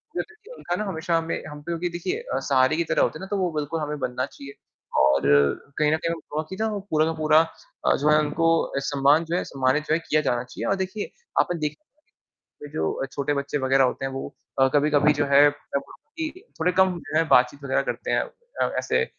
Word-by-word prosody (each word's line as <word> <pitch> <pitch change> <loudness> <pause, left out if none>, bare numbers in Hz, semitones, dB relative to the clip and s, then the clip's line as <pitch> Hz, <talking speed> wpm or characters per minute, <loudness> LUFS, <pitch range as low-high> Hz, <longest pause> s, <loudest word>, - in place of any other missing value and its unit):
जो - - +1
देखिए 430 +3 -14
उनका 175 - -3
ना 210 - -2
हमेशा 165 -2 -1
हमें 165 0 -3
हम 150 0 -9
पे 160 - -10
क्योंकि 170 +1 -1
देखिए 175 - -3
अ, - - -3
सहारे 130 +3 +3
की 170 - +2
तरह - - +1
होते - - 0
हैं - - -11
ना? 190 - -6
तो 205 - -2
वो 180 -3 0
बिल्कुल 150 +2 -2
हमें 150 0 -3
बनना 130 0 -2
चाहिए। 140 0 -11 0.4
और 70 +1 +5 0.6
कहीं 150 0 +3
न - - +4
कहीं 165 - -2
हमें 170 - -4
बहुत-सी 155 +5 -3
ना 220 - +1
वो 210 - -3
पूरा 155 0 +3
का 165 - -1
पूरा 155 -1 +4 0.5
अ, - - +4
जो 150 +2 +1
है 150 - +6
उनको 160 +2 +1 0.4
सम्मान 145 +3 +3
जो 170 +2 -2
है - - 0
सम्मानित 135 +3 0
जो - - +3
है 165 - +2
किया 155 - +3
जाना 120 0 0
चाहिए। 125 - -7
और 195 - +3
देखिए 205 +3 -5 0.3
आप - - -1
ना 170 - -5
देख 150 -1 -2 1.0
जो 80 0 -1
अ, - - -3
छोटे 145 +1 -1
बच्चे 140 +1 -2
वग़ैरह 135 0 +3
होते 130 - -1
हैं 135 - -2
वो 135 - -6 0.3
अ, 135 - +6
कभी-कभी 150 0 +4
जो - - +1
है 145 +1 +8
मतलब 145 -1 -4
उनकी 320 -1 -7 0.3
थोड़े 180 +3 +2
कम 185 -2 +3
जो 150 +2 -5
है 165 - +3
बातचीत 130 +3 +3
वग़ैरह 130 - +1
करते - - -5
हैं - - +3
अ, 485 0 -4
ऐसे 465 - +1
155 Hz, 240 wpm, -24 LUFS, 140-175 Hz, 1.0 s, है